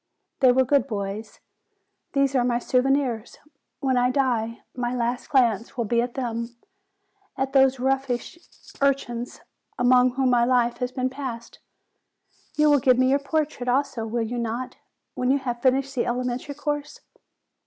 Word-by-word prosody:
They 260 -3 +6
were 260 +1 +3
good 275 -1 +2
boys. 205 0 -5 0.7
These 275 -1 +2
are 255 -3 +3
my 240 -1 +1
souvenirs. 255 -2 0 0.4
When 260 -2 +1
I 245 0 +3
die, 240 -4 -1
my 245 0 -2
last 240 0 -2
glance 235 -4 +1
will 235 - 0
be 235 +2 +2
at 240 0 -4
them; 235 -2 -4 0.8
at 270 0 -2
those 265 -1 +4
roguish 265 +3 -1 0.4
urchins 250 -3 -1 0.4
among 250 0 +4
whom 265 -1 +2
my 240 -1 +4
life 240 -1 +2
has 250 -1 -2
been 255 0 -2
passed. 260 -4 -7 1.0
You 300 0 +4
will 290 - +5
give 255 0 +4
me 255 +1 +3
your 280 - +3
portrait, 285 -3 -2
also, 250 -3 0
will 230 +1 -1
you 240 +2 -3
not, 235 +2 -4 0.4
when 250 - -1
you 275 - +4
have 245 -3 -4
finished 270 +1 +2
the 250 - -1
elementary 250 +3 -3
course?" 295 0 -4
250 Hz, 155 wpm, -24 LUFS, 240-270 Hz, 1.0 s, They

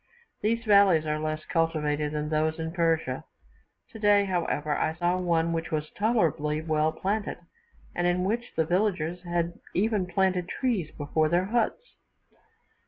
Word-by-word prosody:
These 230 +2 0
valleys 200 -6 +5
are 150 0 -1
less 155 0 -3
cultivated 150 -3 0
than 150 0 -2
those 155 +1 0
in 160 0 -4
Persia; 165 -2 0 0.7
today, 205 -2 +3
however, 160 -5 -1
I 160 - 0
saw 175 +1 0
one 170 -2 +1
which 165 0 -2
was 155 -1 -3
tolerably 165 -9 +1
well 155 -1 +1
planted, 205 +5 -2 0.6
and 175 0 0
in 180 +1 +1
which 235 +5 -2
the 160 - +2
villagers 175 -2 0
had 170 -1 -1 0.2
even 205 -1 +1
planted 185 -1 0
trees 220 - -1
before 155 +1 +1
their 175 +2 +2
huts. 240 - -1
170 Hz, 145 wpm, -27 LUFS, 155-200 Hz, 0.7 s, valleys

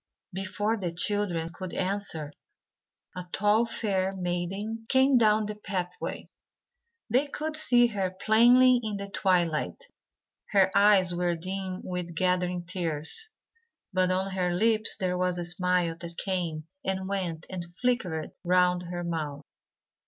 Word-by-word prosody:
Before 205 +4 -1
the 180 -4 -3
children 175 -2 -1
could 185 -1 -7
answer, 185 -6 -2 0.8
a 180 - -5
tall 210 +3 +3
fair 195 -4 -1
maiden 195 +5 -3
came 265 +1 +4
down 215 -2 +4
the 210 - -3
pathway. 185 -4 -4 0.8
They 265 +4 +2
could 305 +2 -4
see 245 -6 +5
her 200 -5 -1
plainly 240 +6 +5
in 215 -3 -3
the 200 0 -6
twilight. 180 - 0 0.7
Her 190 -1 +4
eyes 200 -3 +5
were 175 0 0
dim 185 +2 -5
with 180 -2 -5
gathering 180 0 0
tears, 170 - -2 0.6
but 185 0 +2
on 190 +1 0
her 180 -2 0
lips 220 +4 +3
there 180 -2 -1
was 180 -1 0
a 175 - -3
smile 175 -1 +1
that 170 -1 -8
came 170 -5 -2 0.2
and 190 -4 -2
went 180 -5 -3
and 175 -2 -6
flickered 215 -11 -1
round 180 0 +3
her 175 0 -4
mouth. 155 -4 -4
185 Hz, 135 wpm, -28 LUFS, 175-210 Hz, 0.8 s, see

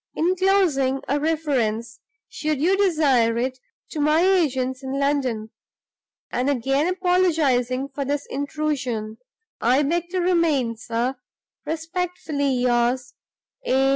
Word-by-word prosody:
Inclosing 350 -7 +2
a 285 +2 +1
reference 255 -8 -1 0.3
(should 305 -2 -2
you 355 +6 +3
desire 290 - +3
it) 255 +2 -2 0.3
to 310 - -4
my 300 +2 +3
agents 270 -9 +1
in 265 0 -4
London, 260 -6 -1 0.8
and 250 +3 0
again 270 +3 +1
apologizing 320 -9 +1
for 280 +1 -4
this 285 +1 -2
intrusion, 265 -6 -3 0.4
I 255 +5 +3
beg 340 +4 -1
to 370 - -3
remain, 335 -10 +2
sir, 235 +3 -2 0.5
respectfully 320 -3 -2
yours, 245 0 +1 0.5
A. 270 - +2
280 Hz, 110 wpm, -23 LUFS, 250-325 Hz, 0.8 s, you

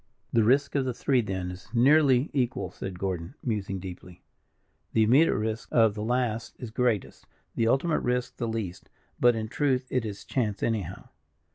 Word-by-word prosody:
"The 115 - +4
risk 135 +6 +3
of 140 - +1
the 130 -2 -2
three, 130 -1 +2
then, 95 -4 -3
is 90 0 -11
nearly 135 +1 +4
equal," 130 -3 -1
said 95 -2 -6
Gordon, 90 - -4
musing 105 -5 -2
deeply. 90 -1 -10 0.7
"The 110 - +4
immediate 135 +9 +5
risk 110 +1 -3
of 115 -3 +4
the 105 - -5
last 120 0 -1
is 120 -4 -7
greatest; 115 -4 -1 0.3
the 115 - +1
ultimate 135 +7 +2
risk 125 0 -1
the 120 - -2
least; 110 -6 -4 0.3
but, 120 -1 +5
in 110 -1 -3
truth, 130 +1 0
it 125 - +1
is 105 -3 -6
chance, 105 -6 -1
anyhow." 100 -6 -2
115 Hz, 170 wpm, -27 LUFS, 100-125 Hz, 0.7 s, immediate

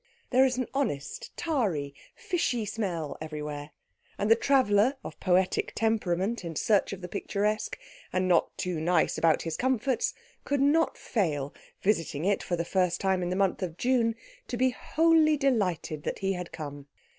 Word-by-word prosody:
There 260 +1 +6
is 255 -1 0
an 255 - 0
honest, 270 - -2
tarry, 195 - -1 0.2
fishy 255 - -1
smell 180 -9 -3
everywhere; 150 -1 -5 0.5
and 205 +2 0
the - - +9
traveller 250 -1 +3
of - - -8
poetic 185 0 +1
temperament 215 -1 0
in 165 -2 -5
search 205 +5 +2
of 195 -1 -6
the 180 - -5
picturesque, 210 +2 -1 0.3
and 185 0 +1
not 175 -2 +2
too 180 -3 -2
nice 175 +2 +2
about 165 -2 +3
his 165 -1 -3
comforts, 260 0 0 0.3
could 285 0 0
not 295 +4 +3
fail, 150 - -1 0.3
visiting 165 -6 0
it 200 0 +2
for 175 - -2
the 170 0 -2
first 180 -1 +1
time 190 -1 +1
in 175 - -1
the 180 - -1
month 195 0 +1
of 175 -3 -4
June, 240 -1 +2 0.3
to 245 - -3
be 255 +1 +3
wholly 315 +2 +3
delighted 200 - 0
that - - -3
he 195 0 0
had 180 -2 -6
come. 145 -3 -7
195 Hz, 170 wpm, -28 LUFS, 170-250 Hz, 0.5 s, the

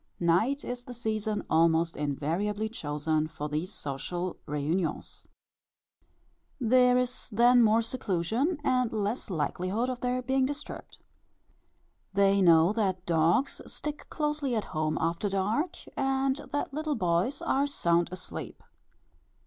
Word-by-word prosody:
Night 200 +12 +2
is 245 0 -4
the 250 - -8
season 215 -2 -2
almost 165 +1 +3
invariably 170 +9 -1
chosen 155 -5 -1
for 155 -2 -5
these 155 +6 -3
social 175 +6 -4
réunions. 155 +4 -2 1.3
There 250 0 +4
is 250 0 -2
then 240 +3 +5
more 225 0 +4
seclusion, 230 - -1
and 250 -4 +2
less 215 +2 -2
likelihood 185 +7 -1
of 250 - -6
their 250 0 -1
being 265 +1 +2
disturbed. 290 +1 -7 1.2
They 200 0 +4
know 170 +1 +6
that 190 -5 -1
dogs 170 - +2
stick 300 0 -5
closely 300 -4 -1
at 215 - 0
home 155 0 0
after 170 +5 0
dark, 210 - 0 0.2
and 270 0 +1 0.2
that 290 -1 -2
little 305 0 -1
boys 180 +8 0
are 275 +2 +2
sound 170 -10 +1
asleep. 185 0 -7
210 Hz, 125 wpm, -29 LUFS, 170-250 Hz, 1.3 s, know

